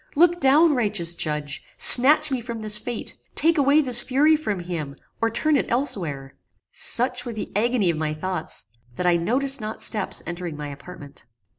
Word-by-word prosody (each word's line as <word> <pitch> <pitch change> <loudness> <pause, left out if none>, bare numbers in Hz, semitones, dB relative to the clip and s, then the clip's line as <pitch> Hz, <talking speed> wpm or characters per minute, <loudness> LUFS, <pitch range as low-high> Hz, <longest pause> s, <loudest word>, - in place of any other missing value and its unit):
Look 345 +3 +3
down, 295 +4 +4
righteous 205 -9 -1
Judge! 150 -3 -4 0.2
snatch 285 +4 +7
me 260 -2 -2
from 230 -1 -8
this 210 -1 -4
fate! 240 0 -7 0.2
take 330 -1 +2
away 285 +2 +3
this 250 -4 -1
fury 295 +4 +2
from 210 - -4
him, 160 -5 -6 0.3
or 230 - +1
turn 305 +7 0
it 275 - -1
elsewhere!" 170 - -3 0.4
Such 250 +1 +1
was 240 -3 -7
the 215 - -7
agony 220 -4 +1
of 160 - -6
my 155 -1 -3
thoughts, 180 +1 -4 0.3
that 180 - -4
I 175 -1 +3
noticed 255 +10 +1
not 215 +1 -4
steps 210 -3 0
entering 170 -2 -7
my 150 -1 -7
apartment. 145 -1 -13
220 Hz, 175 wpm, -22 LUFS, 170-270 Hz, 0.4 s, snatch